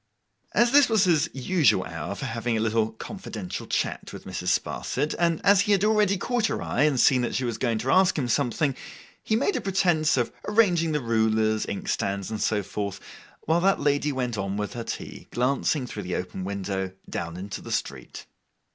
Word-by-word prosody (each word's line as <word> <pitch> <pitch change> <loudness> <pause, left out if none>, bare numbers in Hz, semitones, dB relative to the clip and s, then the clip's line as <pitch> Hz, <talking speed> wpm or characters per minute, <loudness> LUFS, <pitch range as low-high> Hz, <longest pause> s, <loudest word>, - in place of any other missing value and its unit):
As 235 0 +4
this 285 -2 +6
was 220 -3 +4
his 165 -3 +3
usual 135 - +2
hour 80 +4 -5
for 135 - -5
having 115 -1 -1
a - - 0
little 110 0 +1
confidential 110 - -7
chat - - -2
with - - -10
Mrs. - - -5
Sparsit, 150 - -3
and 170 -2 +2
as 200 -1 +6
he 205 0 +2
had 200 0 +2
already 210 -2 +3
caught 240 +3 0
her - - -2
eye - - -1
and 145 -4 +2
seen 130 0 +5
that 120 - -2
she 130 - 0
was 120 -2 -3
going 120 -4 0
to 130 +4 -1
ask 185 -1 +4
him 135 -4 0
something, 135 +3 +1 0.5
he 220 - 0
made 280 - +1
a - - -1
pretence 175 -6 +2
of 120 - 0
arranging 180 -7 +3
the 150 -1 0
rulers, 110 -2 +1
inkstands, 100 0 -2
and 110 - -3
so 105 -2 +1
forth, 100 0 -4 0.4
while 165 +2 +1
that 195 +2 +3
lady 145 0 +1
went 125 -5 -2
on 100 +1 -2
with 105 +2 -3
her 120 -2 -4
tea, - - -7
glancing 135 +2 0
through 110 -4 -6
the 90 -2 -3
open 90 +1 -4
window, 95 -1 -3
down 85 0 -5
into 100 +2 -6
the - - -9
street. - - -4
125 Hz, 200 wpm, -26 LUFS, 110-175 Hz, 0.5 s, this